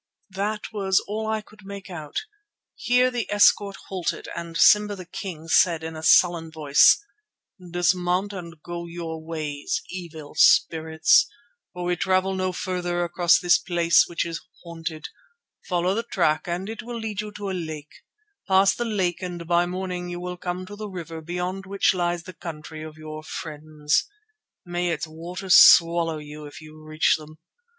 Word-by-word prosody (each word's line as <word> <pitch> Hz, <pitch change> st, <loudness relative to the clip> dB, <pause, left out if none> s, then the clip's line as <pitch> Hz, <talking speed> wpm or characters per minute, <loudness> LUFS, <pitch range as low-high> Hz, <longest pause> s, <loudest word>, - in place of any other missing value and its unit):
That 210 Hz, +3 st, -2 dB
was 190 Hz, -2 st, +2 dB
all 220 Hz, +1 st, -4 dB
I 220 Hz, 0 st, -1 dB
could 210 Hz, -1 st, -19 dB
make 200 Hz, 0 st, -9 dB
out. 155 Hz, -6 st, -5 dB, 0.5 s
Here 250 Hz, +1 st, +2 dB
the 240 Hz, -3 st, -3 dB
escort 205 Hz, -1 st, +4 dB
halted, 185 Hz, -3 st, -3 dB
and 170 Hz, -1 st, -5 dB
Simba 210 Hz, +3 st, +5 dB
the 185 Hz, -2 st, -9 dB
King 170 Hz, -2 st, -7 dB
said 165 Hz, 0 st, +3 dB
in 160 Hz, 0 st, -6 dB
a 155 Hz, -, -7 dB
sullen 170 Hz, 0 st, +4 dB
voice: 150 Hz, -3 st, +5 dB, 0.7 s
"Dismount 180 Hz, +3 st, +1 dB
and 170 Hz, -4 st, -8 dB
go 170 Hz, 0 st, -6 dB
your 165 Hz, -2 st, -6 dB
ways, 155 Hz, -3 st, -4 dB
evil 165 Hz, -5 st, -8 dB
spirits, 160 Hz, +1 st, +4 dB, 0.4 s
for 180 Hz, -1 st, -6 dB
we 175 Hz, 0 st, 0 dB
travel 185 Hz, +1 st, +1 dB
no 185 Hz, -1 st, -1 dB
farther 175 Hz, -1 st, -2 dB
across 175 Hz, 0 st, +3 dB
this 175 Hz, -1 st, +4 dB
place 170 Hz, -2 st, +3 dB
which 170 Hz, 0 st, -2 dB
is 165 Hz, -1 st, -5 dB, 0.2 s
haunted. 165 Hz, -2 st, -6 dB, 0.6 s
Follow 180 Hz, 0 st, +1 dB
the 225 Hz, -, 0 dB
track 170 Hz, -9 st, 0 dB
and 175 Hz, +3 st, -3 dB
it 225 Hz, 0 st, -6 dB
will 240 Hz, 0 st, -6 dB
lead 215 Hz, -3 st, -3 dB
you 210 Hz, 0 st, -7 dB
to 200 Hz, -1 st, -5 dB
a -, -, -3 dB
lake. 155 Hz, -4 st, -6 dB, 0.5 s
Pass 195 Hz, 0 st, +5 dB
the 240 Hz, -, -3 dB
lake 190 Hz, -6 st, -1 dB
and 175 Hz, -2 st, -5 dB
by 175 Hz, +1 st, +2 dB
morning 180 Hz, -1 st, -4 dB
you 175 Hz, 0 st, -5 dB
will 180 Hz, 0 st, -5 dB
come 180 Hz, +1 st, -5 dB
to 205 Hz, +2 st, -9 dB
the 210 Hz, 0 st, -7 dB
river 165 Hz, -3 st, -7 dB
beyond 180 Hz, +3 st, -4 dB
which 195 Hz, 0 st, +2 dB
lies 175 Hz, -2 st, -1 dB
the 185 Hz, -, -10 dB
country 155 Hz, -2 st, -8 dB
of 155 Hz, 0 st, -9 dB
your 155 Hz, 0 st, -8 dB
friends. 155 Hz, -1 st, -2 dB, 0.6 s
May 175 Hz, 0 st, -2 dB
its 165 Hz, -2 st, -2 dB
waters 175 Hz, +4 st, -1 dB
swallow 165 Hz, -1 st, +6 dB
you 150 Hz, 0 st, -9 dB
if 145 Hz, -, -11 dB
you 155 Hz, 0 st, -13 dB
reach 155 Hz, 0 st, +1 dB
them. 155 Hz, 0 st, -13 dB
175 Hz, 170 wpm, -24 LUFS, 160-190 Hz, 0.7 s, swallow